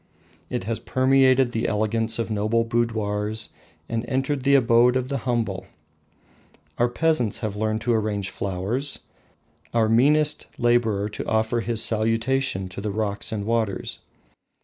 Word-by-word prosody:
It -, -, -3 dB
has 110 Hz, +3 st, -3 dB
permeated 130 Hz, -1 st, +3 dB
the 115 Hz, -1 st, -1 dB
elegance 110 Hz, +1 st, 0 dB
of 115 Hz, -1 st, -3 dB
noble 110 Hz, +2 st, +1 dB
boudoirs, 110 Hz, -2 st, -1 dB, 0.4 s
and 115 Hz, 0 st, -2 dB
entered 135 Hz, +2 st, -1 dB
the 140 Hz, +2 st, +4 dB
abode 120 Hz, -1 st, +4 dB
of 130 Hz, 0 st, -1 dB
the 140 Hz, -1 st, -1 dB
humble. 110 Hz, -6 st, -1 dB, 1.1 s
Our 120 Hz, +1 st, +3 dB
peasants 125 Hz, -5 st, +1 dB
have 110 Hz, -3 st, -3 dB
learned 110 Hz, +1 st, -1 dB
to 120 Hz, +2 st, +1 dB
arrange 105 Hz, -3 st, -1 dB
flowers, 100 Hz, +9 st, -3 dB, 0.7 s
our 115 Hz, -1 st, +3 dB
meanest 150 Hz, +6 st, +3 dB
labourer 115 Hz, -4 st, +2 dB
to 105 Hz, -, -6 dB
offer 110 Hz, +2 st, +1 dB
his 115 Hz, -1 st, 0 dB
salutation 115 Hz, -1 st, 0 dB
to 95 Hz, -, -7 dB
the 105 Hz, -, -2 dB
rocks 100 Hz, -1 st, -2 dB
and 105 Hz, -2 st, -3 dB
waters. 115 Hz, -3 st, -1 dB
115 Hz, 140 wpm, -24 LUFS, 110-125 Hz, 1.1 s, the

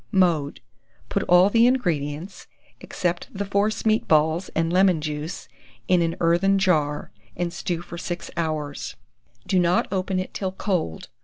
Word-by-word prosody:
Mode. 165 Hz, -8 st, +1 dB, 0.5 s
Put 200 Hz, -, 0 dB
all 180 Hz, +3 st, +6 dB
the 230 Hz, +2 st, +5 dB
ingredients, 170 Hz, -, -2 dB, 0.3 s
except 175 Hz, -1 st, -3 dB
the 200 Hz, 0 st, -4 dB
force 200 Hz, +3 st, 0 dB
meat 220 Hz, 0 st, +2 dB
balls 160 Hz, +3 st, +2 dB
and 165 Hz, +1 st, +1 dB
lemon 185 Hz, -2 st, +4 dB
juice, 150 Hz, +3 st, -5 dB, 0.4 s
in 180 Hz, -1 st, +4 dB
an 165 Hz, 0 st, 0 dB
earthen 175 Hz, +4 st, +3 dB
jar, 155 Hz, -7 st, +1 dB, 0.3 s
and 175 Hz, -1 st, -2 dB
stew 175 Hz, -1 st, -3 dB
for 170 Hz, 0 st, -8 dB
6 175 Hz, 0 st, -5 dB
hours. 155 Hz, -3 st, -3 dB, 0.5 s
Do 185 Hz, -, +2 dB
not 175 Hz, 0 st, +2 dB
open 190 Hz, -1 st, -1 dB
it 185 Hz, -, -3 dB
till 190 Hz, -2 st, -3 dB
cold. 180 Hz, -, -2 dB
175 Hz, 150 wpm, -24 LUFS, 160-190 Hz, 0.5 s, all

